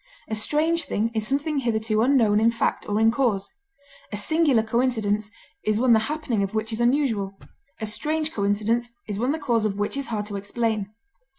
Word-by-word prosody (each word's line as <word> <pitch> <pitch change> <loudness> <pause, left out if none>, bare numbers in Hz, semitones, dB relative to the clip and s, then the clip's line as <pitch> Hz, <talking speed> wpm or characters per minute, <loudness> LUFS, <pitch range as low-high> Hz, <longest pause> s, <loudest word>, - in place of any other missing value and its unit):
A 220 - -2
strange 310 +9 +1
thing 225 +3 -1
is 220 -1 -1
something 285 +2 0
hitherto 220 -3 0
unknown 230 -5 +4
in 225 +1 +4
fact 230 -1 -1
or 205 +1 +1
in 225 0 +5
cause. 230 -6 0 0.6
A 205 - -3
singular 280 0 +3
coincidence 220 -3 0 0.3
is 215 0 +1
one 250 -1 +5
the 220 - +6
happening 300 -9 -1
of 195 +2 -2
which 220 +1 -1
is 220 - -1
unusual; 235 -7 +1 0.4
a 220 - -2
strange 310 +8 -1
coincidence 215 +4 0 0.2
is 205 -1 -3
one 250 +4 +1
the 315 - -1
cause 240 -7 0
of 205 -2 -1
which 205 +4 -1
is 275 0 -3
hard 210 -3 -2
to 205 -1 -5
explain. 210 0 -1
225 Hz, 190 wpm, -24 LUFS, 210-260 Hz, 0.6 s, the